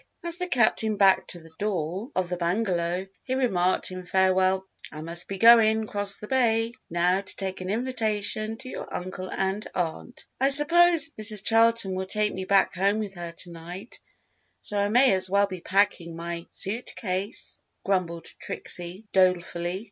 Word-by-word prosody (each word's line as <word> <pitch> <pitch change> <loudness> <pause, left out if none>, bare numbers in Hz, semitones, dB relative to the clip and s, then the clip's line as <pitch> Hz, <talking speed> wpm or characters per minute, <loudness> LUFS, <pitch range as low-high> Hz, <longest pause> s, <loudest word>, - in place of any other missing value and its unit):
As 340 +1 +2
the 360 - -1
Captain 220 -6 +1
backed 195 -1 +3
to 175 - -2
the 165 -1 -15
door 195 - -3
of 185 -1 -1
the 180 - -3
bungalow, 175 0 -2 0.2
he 260 - -4
remarked 185 -9 0
in 185 0 -8
farewell, 190 +1 +1 0.3
"I 155 0 -9
must 170 +2 +3
be 195 - -5
goin' 220 0 +5
across 205 -2 -2
the 210 - -9
bay, 230 -3 0 0.2
now, 175 +3 0
to 195 - -6
take 190 -1 -5
an 185 - -6
invitation 220 -2 -2
to 255 - -10
your - - -8
uncle 185 +1 -6
and 195 +2 -2
aunt." 180 +8 -5
"I 270 +1 +2
s'pose 330 +3 +7
Mrs. 215 -2 +7
Charlton 225 -3 +3
will 190 0 -4
take 210 +2 0
me 190 0 -6
back 195 0 +2
home 195 +3 0
with 210 -3 -5
her 175 -2 -8
to 175 +1 -8
night, 175 +6 -10 0.6
so 210 - -7
I 200 0 0
may 250 +3 +4
as 185 0 +1
well 200 +1 +2
be 185 -3 -9
packing 185 -3 0
my 170 0 -6
suit 225 +6 -1
case," 195 +2 -2 0.2
grumbled 175 -4 -2
Trixie, 175 +4 -1
dolefully. 180 -1 0
195 Hz, 170 wpm, -25 LUFS, 180-220 Hz, 0.6 s, s'pose